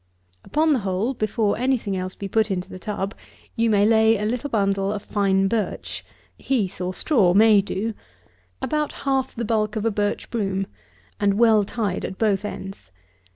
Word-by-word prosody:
Upon 310 +1 +2
the 265 - +1
hole, 195 +5 -1
before 215 -2 0
any 260 +1 +2
thing 200 -4 -4
else 185 0 -4
be 200 - -5
put 220 +2 +1
into 190 0 -3
the 185 - -8
tub, 200 0 -3 0.4
you 230 0 +2
lay 220 +2 +4
a 210 - -2
little 245 +6 -2
bundle 195 -3 +1
of 210 -1 -4
fine 195 -2 +1
birch, 215 0 -3 0.4
(heath 210 -9 -1
or 180 0 -1
straw 185 - +2
may 215 -1 +6
do,) 205 +3 -3 0.7
about 300 -1 -1
half 270 -1 0
the 235 - -3
bulk 215 -1 0
of 215 0 -2
a 225 - +2
birch 205 0 -2
broom, 195 -4 -1 0.5
and 200 -1 +2
well 220 -1 +5
tied 200 -2 -2
at 190 - -5
both 205 -3 +1
ends. 195 - -7
210 Hz, 175 wpm, -23 LUFS, 195-230 Hz, 0.7 s, may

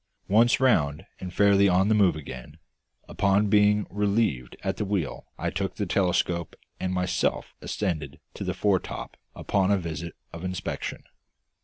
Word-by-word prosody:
Once 115 +4 +4
round 85 - +2
and 90 - -6
fairly 100 +1 +4
on 95 +2 +3
the 110 - +4
move 100 -6 +4
again, 65 -5 -9 0.5
upon 100 +1 +2
being 105 0 +4
relieved 100 - 0
at 95 0 -1
the - - -1
wheel 95 -8 -2
I - - -2
took - - -3
the - - -2
telescope 90 -3 0 0.2
and 95 - -2
myself 90 0 -1
ascended 80 -9 -3
to - - -6
the - - -2
foretop 100 -3 -1 0.2
upon 95 -1 +1
a 100 - +4
visit 85 -1 -5 0.2
of 85 +1 -8
inspection. 90 -1 -4
95 Hz, 150 wpm, -26 LUFS, 85-105 Hz, 0.5 s, Once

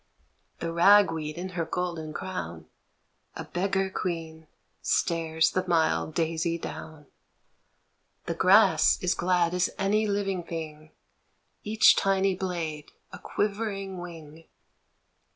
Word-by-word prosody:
The 165 0 -3
rag 195 +2 +6
weed 155 -1 -5
in 185 +2 -5
her 175 -2 -3
golden 165 -1 -4
crown, 85 - -6 0.7
A - - -5
beggar 195 +1 -1
queen, 160 -4 -5 0.3
stares 160 -2 +1
the 185 - 0
mild 160 -2 +1
daisy 165 0 0
down. 155 -2 -8 1.2
The - - -2
grass 70 0 +5
is - - +2
glad 175 -1 +1
as 180 0 +1
any 210 +2 +1
living 200 -2 -1
thing, 155 -2 -7 0.7
Each 215 +1 +5
tiny 195 0 +2
blade 170 -5 -4 0.2
a - - -8
quivering 200 -2 -3
wing. 165 -2 -10
170 Hz, 115 wpm, -27 LUFS, 160-190 Hz, 1.2 s, rag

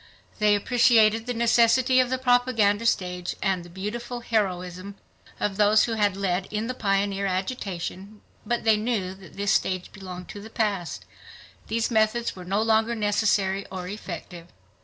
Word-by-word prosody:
They 210 -1 +4
appreciated 225 0 +3
the 245 - -1
necessity 235 +2 +4
of 255 -1 +3
the 260 - 0
propaganda 245 -4 +2
stage 180 -4 -1
and 190 -3 0
the 175 - -13
beautiful 235 +7 -5
heroism 185 -4 -2 0.4
of 200 -2 -1
those 210 +1 +5
who 235 - -1
had 205 -3 +1
led 190 -1 -1
in 215 +1 -2
the 255 - -3
pioneer 200 -3 0
agitation, 195 0 -4 0.2
but 235 +2 -2
they 220 -2 +4
knew 210 -4 -2
that 190 -1 -15
this 200 0 0
stage 185 -1 0
belonged 185 -2 -9
to 205 - -8
the 220 - -10
past; 205 -7 -2 0.6
these 230 +2 -1
methods 220 +1 +1
were 185 - -9
no 200 +4 0
longer 225 +1 +2
necessary 205 -2 +1
or 185 -1 -6
effective. 175 -3 -8
210 Hz, 160 wpm, -25 LUFS, 190-230 Hz, 0.6 s, those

